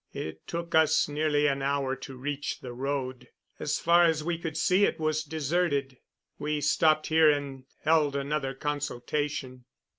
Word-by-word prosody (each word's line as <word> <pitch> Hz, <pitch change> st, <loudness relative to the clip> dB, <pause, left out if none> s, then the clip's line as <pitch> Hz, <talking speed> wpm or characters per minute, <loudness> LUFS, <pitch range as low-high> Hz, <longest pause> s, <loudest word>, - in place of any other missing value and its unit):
It 80 Hz, 0 st, -6 dB
took 170 Hz, 0 st, -5 dB
us 160 Hz, -1 st, +4 dB
nearly 150 Hz, 0 st, +1 dB
an 140 Hz, -1 st, +1 dB
hour 135 Hz, -1 st, 0 dB
to 135 Hz, 0 st, -9 dB
reach 145 Hz, +2 st, -4 dB
the 125 Hz, -1 st, -7 dB
road. 130 Hz, 0 st, -3 dB, 0.3 s
As -, -, -1 dB
far 170 Hz, +1 st, +4 dB
as 160 Hz, -2 st, +1 dB
we 170 Hz, 0 st, -2 dB
could 160 Hz, -3 st, -4 dB
see 185 Hz, +5 st, +3 dB
it -, -, +1 dB
was 155 Hz, -1 st, 0 dB
deserted. 145 Hz, -3 st, -1 dB, 0.4 s
We 150 Hz, 0 st, -1 dB
stopped 155 Hz, +1 st, +3 dB
here 160 Hz, -1 st, +5 dB
and 140 Hz, -3 st, -2 dB, 0.2 s
held 155 Hz, -3 st, +3 dB
another 140 Hz, -1 st, -2 dB
consultation. 145 Hz, -2 st, -3 dB
145 Hz, 155 wpm, -28 LUFS, 135-155 Hz, 0.4 s, here